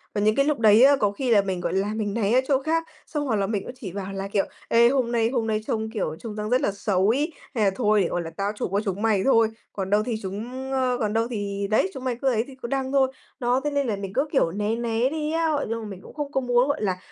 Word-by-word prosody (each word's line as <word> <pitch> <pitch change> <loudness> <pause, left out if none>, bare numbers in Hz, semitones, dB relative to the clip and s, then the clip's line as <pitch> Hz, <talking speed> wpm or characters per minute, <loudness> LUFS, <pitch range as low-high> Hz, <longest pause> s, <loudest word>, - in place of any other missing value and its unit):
Và 205 - +1
những 215 +1 +3
cái 275 - +3
lúc 295 -3 0
đấy 220 +1 +6
á, 280 +1 +7
có 205 -6 +1
khi 245 +3 -2
là 205 - +6
mình, 190 -2 -3
gọi - - -2
là, 200 +2 0
mình 210 -2 -2
né 220 -1 0
ra 255 - +5
chỗ 275 -2 +2
khác. 325 +2 +1 0.2
Xong 295 -2 -2
hoặc 245 -5 0
là 200 -1 0
mình 205 -2 -2
cũng - - -7
chỉ 195 -7 -6
bảo 195 +1 -5
là 195 0 -4
kiểu: 195 0 +1 0.2
"Ê, 235 +1 +5
hôm 250 -3 +1
nay 230 -1 +2
hôm 240 -3 -1
nay 215 -1 0
trông, 220 -1 -1
kiểu, 200 -8 -3
trông 220 -3 -7
rằng 210 0 -3
rất 250 +1 +3
là - - +1
xấu 195 -1 +1
ấy, 290 +8 +1 0.2
hay 220 - +2
là 195 - +4
thôi 210 -3 +3
để, 180 - +1
gọi 175 - -2
là, 165 - -6
tao 200 +1 0
chụp - - -3
cho 200 - +3
chúng 195 0 -2
mày 215 -4 +2
thôi, 230 -4 +4 0.2
còn 190 -2 -3
đâu 205 +1 +3
thì 240 - -1
chúng, 240 +8 -5
ờ 255 -2 +1
còn 210 -2 -1
đâu 225 +1 +1
thì 200 -3 -3
đấy, 195 -3 +3
chúng 260 - -7
mày 255 -2 -1
cứ 275 - 0
ấy 225 -2 +1
thì 270 - -11
cứ 235 - -4
đăng 265 0 -2
thôi." 265 -1 +3 0.3
Đó! 250 +1 +1
Thế 295 - -1
nên 280 -2 0
là 215 - 0
mình 195 -1 -6
cứ, 275 +6 +1
kiểu, 215 - +2
né 210 +4 -1
né 235 +1 0
đi 305 0 -2
á, 330 0 +1
ờ, 285 - -2
nhưng 230 0 -2
mà - - -7
mình 190 -2 -9
cũng - - -13
không 290 -1 -4
có 265 - 0
muốn, 245 +1 +3
gọi 285 -2 -1
là, 185 -3 0
225 Hz, 310 wpm, -25 LUFS, 205-260 Hz, 0.3 s, á